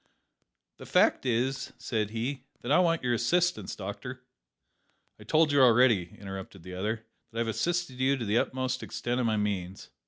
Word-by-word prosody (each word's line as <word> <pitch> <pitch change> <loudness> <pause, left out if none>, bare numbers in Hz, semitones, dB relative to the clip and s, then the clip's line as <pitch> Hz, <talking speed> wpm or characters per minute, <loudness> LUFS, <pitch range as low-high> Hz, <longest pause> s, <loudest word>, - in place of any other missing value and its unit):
"The - - -11
fact - - +3
is," 125 +3 0
said 110 -3 -2
he, 125 +4 -3 0.2
"that 120 - -3
I 150 - +6
want 165 -4 +2
your 125 -1 +1
assistance, 175 +10 +1
doctor 125 +6 -7 0.5
" - - -44
"I - - -11
told 155 -1 +3
you 145 -1 +4
already," 115 -7 +4
interrupted 95 -2 -8
the 90 +1 -8
other, 110 +4 -3 0.2
"that 115 - -10
I - - +1
have 115 - -1
assisted 170 +2 -1
you 135 +1 +3
to 120 - -4
the 105 +3 +3
utmost 130 0 -1
extent 120 +1 -3
of 120 - +1
my 110 -1 +1
means." 100 -3 -3
120 Hz, 185 wpm, -29 LUFS, 105-130 Hz, 0.5 s, I